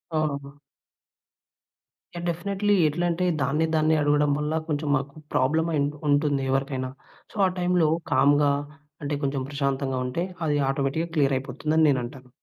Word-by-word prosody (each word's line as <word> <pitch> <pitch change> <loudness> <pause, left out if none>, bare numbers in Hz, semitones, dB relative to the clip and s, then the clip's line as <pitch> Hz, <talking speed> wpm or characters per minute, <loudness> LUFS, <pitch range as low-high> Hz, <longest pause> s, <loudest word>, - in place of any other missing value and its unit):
ఆహా! 140 -2 -2 1.6
Yeah! 175 0 -5
Definitely. 200 +4 0
ఎట్లా 165 +4 -1
అంటే 170 +2 -1 0.2
దాన్ని 150 +4 +1
దాన్ని 155 0 +3
అడగడం 145 0 +3
వల్ల 150 +1 -1
కొంచెం 150 -1 -2
మాకు 140 0 -3 0.2
ప్రాబ్లమ్ 160 +6 +2
అయి 150 - +2 0.3
ఉంటుంది 145 -1 +2
ఎవరికైనా. 135 -1 -1 0.4
సో - - -19
ఆ - - +4
టైంలో 180 -2 +2 0.2
కామ్‌గా 145 +2 +4 0.5
అంటే 145 0 -2
కొంచెం 135 -1 -1
ప్రశాంతంగా 140 -2 -1
ఉంటే. 145 +7 -2 0.2
అది 150 -1 +1
ఆటోమేటిక్‌గా 140 +4 -1
క్లియర్ 140 -3 +3
అయిపోతుందని 155 +4 0
నేనంటాను. 130 -1 -3
145 Hz, 135 wpm, -25 LUFS, 135-160 Hz, 1.6 s, ఆ